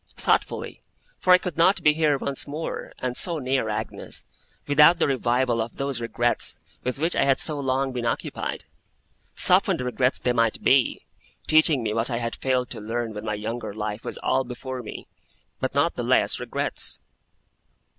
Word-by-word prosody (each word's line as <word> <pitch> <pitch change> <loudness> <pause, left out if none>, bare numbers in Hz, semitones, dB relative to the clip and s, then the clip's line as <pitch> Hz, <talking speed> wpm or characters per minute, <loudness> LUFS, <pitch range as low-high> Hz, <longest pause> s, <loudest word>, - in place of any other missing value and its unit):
Thoughtfully, - - -1 0.4
for 185 - +2
I 180 - +9
could 180 -4 -6
not 185 +4 +3
be 150 - +5
here 150 -2 +2
once 140 +1 -2
more, 150 +3 -5
and 125 -1 -3
so 170 +3 +1
near 130 -4 -1
Agnes, 105 - -3 0.4
without 150 +4 +6
the 165 - +2
revival 125 -3 +1
of 115 +1 -6
those 135 -3 -2
regrets 120 +1 0 0.3
with 125 +1 -2
which 165 +5 0
I - - +3
had 135 -1 +2
so 150 -2 +2
long 135 0 0
been 120 -2 -3
occupied. 115 - -3 0.7
Softened - - +5
regrets 125 +1 0
they 125 - 0
might 115 -2 +1
be, 130 -2 +3 0.4
teaching 155 -4 +4
me 105 -1 -1
what 115 +3 0
I 120 - -1
had 115 0 -3
failed 130 -2 -1
to 115 - -5
learn 115 +1 -3
when 105 +1 -7
my 105 -1 -1
younger 110 0 -5
life 105 0 -4
was - - -5
all 130 +1 +2
before 130 +1 -6
me, 115 - -9 0.5
but - - -3
not - - +2
the - - -4
less - - +2
regrets. - - -2
125 Hz, 175 wpm, -24 LUFS, 115-140 Hz, 0.7 s, I